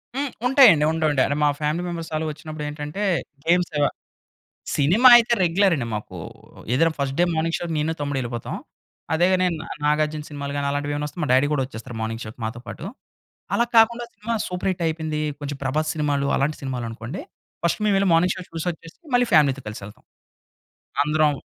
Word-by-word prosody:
హ్మ్. 280 0 -2 0.2
ఉంటాయండి.. 245 - +7
ఉంటా 160 -1 0
ఉంటాయి. 135 -3 +3
అంటే 145 - -1
మా - - +5
ఫ్యామిలీ 155 +3 -1
మెంబర్స్ 170 -2 -5
ఆళ్ళు 155 +1 -1
వచ్చినప్పుడేంటంటే 150 +3 -5 0.4
గేమ్సు 170 -3 +2 1.0
సినిమా 185 - +6
అయితే 235 0 +2
రెగ్యులర్ 185 +2 +3
అండి 120 -6 -3
మాకు. 105 - -7 0.6
ఏదన్నా 165 +5 +3
ఫస్ట్ 135 -1 -1
డే - - +6
మార్నింగ్ 165 +1 0
షో‌కి 170 -1 -4
నేను 155 +2 0
తమ్ముడెళ్ళిపోతాం. 130 -5 -3 0.6
అదేగనే 180 +3 +3
నా 160 - -8 0.2
నాగార్జున 150 0 +1
సినిమాలు 140 -1 -5
గాని 140 0 -1
అలాంటివేమన్నా 145 +1 -2
వస్తే 150 - -13
మా - - -1
డ్యాడీ 130 +3 +4
గూడా 140 -3 +1
వచ్చేస్తారు 120 -1 -9
మార్నింగ్ 115 +1 -3
షో‌కి 110 +2 -10
మాతో 115 +2 -5
పాటు. - - -7 0.7
అలా 235 - +3
కాకుండా 235 +2 +5
సినిమా 230 +2 -4
సూపర్ 180 +1 -2
హిట్ 185 -2 -3
అయిపోయింది. 160 -1 -2 0.2
కొంచెం 145 -1 -4
ప్రభాస్ 155 +4 0
సినిమాలు 145 -2 0
అలాంటి 150 +3 0
సినిమాలనుకోండి, 120 +3 -5 0.4
ఫస్ట్ 170 - +1
మేం 210 - +3
వెళ్ళి 195 0 +2
మార్నింగ్ 180 +2 +3
షో 185 - -6
చూసొచ్చేసి 165 - -5
మళ్ళీ 245 -1 +4
ఫ్యామిలీ‌తో 140 -3 +4
కలిసెళ్తాం. 105 -1 -9 1.0
అందరం 155 0 +3
155 Hz, 165 wpm, -23 LUFS, 140-175 Hz, 1.0 s, ఉంటాయండి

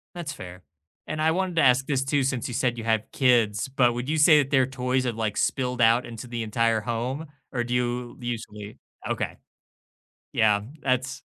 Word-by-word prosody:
That's 170 -4 -5
fair. 90 0 -10 0.4
And 155 0 -4
I 160 +1 +3
wanted 185 0 -1
to - - +5
ask 130 0 +4
this 135 -2 0
too 135 0 +1
since 130 -3 -1
you 125 - -6
said 120 -1 0
you 115 - -5
have 110 -1 +1
kids, 115 -4 +2
but 125 -3 +3
would 120 +4 -4
you 160 - +1
say 150 0 +7
that 135 -1 0
their 135 -3 +4
toys 130 0 -1
have, 120 - -1
like, 110 -2 -2
spilled 125 -2 0
out 115 +2 +4
into 120 +1 -8
the 120 -1 -4
entire 115 0 +1
home? 125 +8 -3 0.3
Or 120 -2 0
do 120 - -4
you 125 0 -2
usually 110 -3 -6 0.3
Okay. - - -2 1.0
Yeah, 105 -2 +3 0.2
that's 130 0 -1
125 Hz, 195 wpm, -25 LUFS, 115-135 Hz, 1.0 s, say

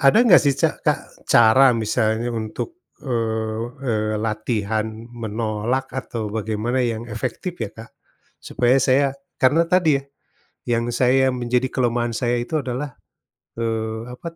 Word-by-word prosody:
Ada 140 +10 +5
enggak 185 -7 +7
sih 140 -1 +3
ca - - +5
Kak, - - +1 0.3
cara 120 +2 +6
misalnya 110 +1 0
untuk, 110 - -4 0.4
eee 110 -3 -1 0.2
eee, 110 -3 0
latihan 110 -1 -1 0.3
menolak 115 +3 -2
atau 115 -5 -4
bagaimana 110 +3 -1
yang 115 -2 -1
efektif 120 - -4
ya, 110 - -2
Kak? 115 +2 -12 0.5
Supaya 125 +1 +2
saya 135 +2 +4 0.3
karena 165 +6 +3
tadi 165 -6 +3
ya, - - -16 0.7
yang 115 +1 -1
saya 130 +2 +3
menjadi 125 +1 0
kelemahan 120 -2 0
saya 120 -1 0
itu 155 +5 -2
adalah, 130 0 -4 0.6
eee, 110 0 -2
apa 125 +7 -7
120 Hz, 135 wpm, -22 LUFS, 110-130 Hz, 0.7 s, enggak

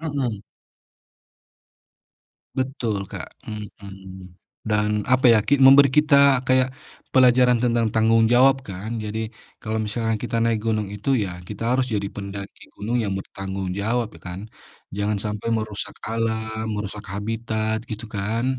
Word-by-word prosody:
Mhm. 135 -10 -2 2.1
Betul, 130 -5 -2
Kak, - - -6 0.2
mhm. 95 -3 -9 0.4
Dan 105 0 +2 0.2
apa 130 +1 +3
ya, 115 - +6
ki 140 -1 +3
memberi 140 +1 +9
kita 140 -3 +5
kayak 130 0 +4 0.5
pelajaran 125 -1 +5
tentang 120 -2 +2
tanggung 110 0 +4
jawab 130 +2 +6
kan? 100 +4 -6
Jadi, 105 +1 -4 0.4
kalau 110 0 -2
misalkan 115 0 -1
kita 115 -1 -2
naik 115 -1 +2
gunung 110 -2 0
itu 105 +5 -6 0.2
ya, 95 - -4 0.2
kita 105 +1 -7
harus 130 0 +2
jadi 100 -1 -1
pendaki 100 0 -7
gunung 115 +4 -2
yang 100 -2 -2
bertanggung 95 -1 -5
jawab, 115 +3 0
ya - - -14
kan? 90 +2 -6 0.6
Jangan 105 0 0
sampai 105 +1 -3
merusak 110 -2 -4 0.2
alam, 110 -1 -2
merusak 105 0 -5
habitat, 110 +1 -2
gitu 110 +1 -5
kan? 105 +4 -1
110 Hz, 135 wpm, -23 LUFS, 105-125 Hz, 2.1 s, memberi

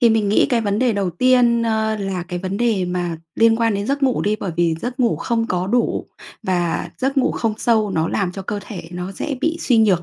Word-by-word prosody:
thì 235 -3 +5
mình 215 -2 +2
nghĩ 210 - +4
cái 240 -3 +2
vấn 205 -1 0
đề 250 -3 +2
đầu 195 -3 -1
tiên, 240 +3 +3
ơ, 220 -1 0
là 195 -3 -3
cái 180 - -3
vấn 190 +2 -3
đề 225 -5 +1
mà 175 -2 -2 0.2
liên 225 0 +4
quan 230 -2 +1
đến 200 +2 -2
giấc 280 +1 -1
ngủ 260 -2 +2
đi, 210 +1 +1
bởi 185 - -3
vì 170 -2 +2
giấc 250 +2 -4
ngủ 235 -2 +2
không 230 -1 -1
có 180 0 -1
đủ 240 +3 0 0.4
và 175 -2 -1
giấc 270 +2 -1
ngủ 255 - +2
không 225 -2 -1
sâu 220 -4 +2
nó 165 -2 0
làm 190 -3 -1
cho 195 +1 -6
cơ 205 +2 -3
thể 185 -6 -8
nó 180 +2 -5
dễ 280 +8 -3
bị 325 +2 0
suy 240 -4 +3
nhược, 195 -6 +3
215 Hz, 250 wpm, -20 LUFS, 185-235 Hz, 0.4 s, thì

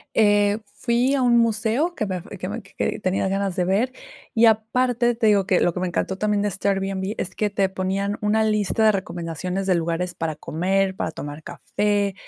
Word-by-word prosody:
Eh, 205 -1 +4 0.2
fui 245 +3 +1
a 275 - +1
un 240 -1 +4
museo 230 +8 +1
que 215 - -2
me 190 -2 -2
f 180 +3 -9
que 185 - -4
me 220 +3 -5
que 195 - -3
tenía 190 0 0
ganas 195 -1 -1
de 180 - +1
ver, 205 +8 +1 0.4
y 230 -1 +5
aparte, 240 +2 +2
te 225 -1 0
digo 205 -2 +4
que 185 -2 +3
lo 175 - +2
que 180 - -3
me 185 - 0
encantó 185 +2 -2
también 210 0 0
de 205 - +1
este 195 +1 -2
Airbnb 195 0 -1
es - - -4
que 210 -1 0
te 195 -1 +1
ponían 190 +2 -2
una 210 +1 +2
lista 215 0 +1
de 215 - +6
recomendaciones 180 0 -3
de 190 - +3
lugares 170 +1 -1
para 165 -1 -3
comer, 190 +5 0
para 160 - -2
tomar 145 0 -7
café, 205 +3 -1
200 Hz, 210 wpm, -23 LUFS, 185-220 Hz, 0.4 s, de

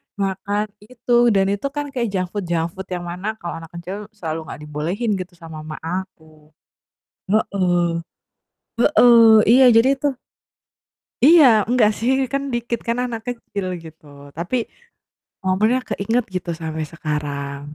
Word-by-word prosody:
makan 200 +1 -2
itu 240 +2 +1
dan 195 0 +3
itu 205 +7 -2
kan 290 -1 -3
kayak 245 -4 -1
junk 185 -3 -2
food 205 -4 -4
junk 170 -1 -1
food 190 +2 -9
yang 180 -1 -4
mana 180 +5 -4
kalau 175 -6 -6
anak 165 - -10
kecil 190 +5 -7
selalu 160 -5 -5
nggak - - -8
dibolehin 165 +10 -2
gitu 180 0 -8
sama 165 -2 -10
mama 155 0 -7
aku. 160 -4 -7 0.8
Heeh. 180 -5 +1 1.1
Heeh, 230 -2 +8
iya, 255 +4 +7
jadi 240 +4 +5
itu 285 +1 -1 1.1
Iya 320 +1 +8 0.2
enggak 235 -3 +4
sih 235 +3 0 0.2
kan 275 0 0
dikit 235 0 -2
kan 235 - +1
anak 235 -2 -4
kecil 205 -5 -5 0.2
gitu, 160 -1 -14 0.3
tapi 175 +9 -2 0.9
momennya 210 +7 +2
keinget 230 +5 0
gitu 180 -1 -3
sampai 160 -1 -4
sekarang. 145 -3 -4
195 Hz, 140 wpm, -21 LUFS, 165-230 Hz, 1.1 s, Heeh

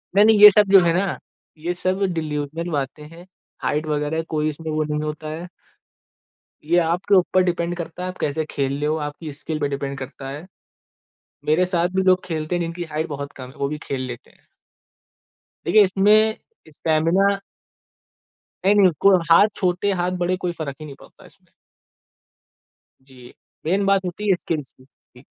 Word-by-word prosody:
नहीं-नहीं, 210 +1 +6
ये 210 - +13
सब 205 0 +4
जो 195 - +9
है 165 - +3
ना, 190 +2 0 0.4
ये 170 +3 -2
सब 185 +2 -2
डिल्यूजनल 155 +1 -3
बातें 140 0 -3
है, 170 +2 -14 0.4
हाइट 150 +2 -1
वगैरह 150 +1 -1
कोई 155 -1 0
इसमें 155 +1 -6
वो 155 0 0
नहीं 150 0 -2
होता 155 0 -5
है। 165 +3 -6 1.2
ये 170 +3 +2
आपके 175 +4 +1
ऊपर 185 0 +3
डिपेंड 175 -1 -1
करता 170 +1 -6
है - - -3
आप 185 - -8
कैसे 155 +2 -1
खेल 135 -1 -1
ले 145 - -1
हो, 155 +1 +1
आपकी 150 +1 -8
स्किल 155 +2 -5
पे 145 - 0
डिपेंड 140 0 -4
करता 135 0 -8
है। 140 +2 -7 1.0
मेरे 160 +4 +3
साथ 175 -1 0
भी 190 - +3
लोग 185 -1 +3
खेलते 160 -1 -3
हैं 175 - -1
जिनकी 170 +1 -4
हाइट 155 +2 -2
बहुत 140 -1 -6
कम 130 -1 -9
है, 130 - -16
वो 140 - -1
भी 150 - -4
खेल 135 -2 -3
लेते 120 -1 -9
हैं। - - -30 1.2
देखिए 215 - +5
इसमें 210 +3 +3 0.3
स्टैमिना 165 +6 +2 1.3
नहीं-नहीं, 200 -2 +5
को 195 -1 +6 0.2
हाथ 200 +5 +7
छोटे 185 +2 0
हाथ 180 +1 0
बड़े 185 +1 0
कोई 180 -1 -3
फ़र्क 140 -3 -4
ही 155 - -8
नहीं 140 -2 -10
पड़ता - - -18
इसमें। - - -22 1.5
जी, 130 -2 -16 0.3
मेन 195 +5 +1
बात 195 -1 +2
होती 200 +4 -3
है 190 - +5
स्किल्स 155 -5 -4
की। 130 - -22
जी। 130 -1 -23
165 Hz, 175 wpm, -22 LUFS, 150-185 Hz, 1.5 s, ये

